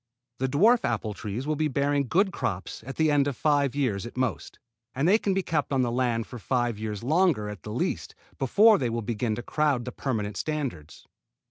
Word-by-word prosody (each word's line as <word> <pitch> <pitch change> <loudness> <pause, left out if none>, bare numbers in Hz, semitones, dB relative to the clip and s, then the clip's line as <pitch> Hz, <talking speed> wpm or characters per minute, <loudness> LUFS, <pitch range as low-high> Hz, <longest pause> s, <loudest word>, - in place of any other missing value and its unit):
The 130 - +1
dwarf 215 - +4
apple 110 -2 -1
trees 105 +6 -5
will 155 0 0
be 155 +1 +1
bearing 140 0 0
good 190 - +2
crops 95 - -4
at 135 - -5
the 155 -1 +2
end 145 -1 +3
of 140 - -3
five 145 -3 +2
years 120 -9 0
at 120 +2 -9
most; 125 -6 -2 0.4
and 140 +5 +1
they 210 +5 +5
can 195 -3 0
be 195 - 0
kept 150 -4 -1
on 135 -2 +2
the 120 - 0
land 120 -2 0
for 125 - -9
five 120 -2 -1
years 105 -1 -4
longer 155 - +2
at 105 -4 -8
the - - -7
least, - - -2 0.2
before 205 - +5
they 125 -4 0
will 115 0 -2
begin 110 0 -1
to 120 - -6
crowd 145 -5 0
the 125 - -4
permanent 105 -7 -3
standards. 140 - -4
130 Hz, 215 wpm, -27 LUFS, 115-150 Hz, 0.4 s, they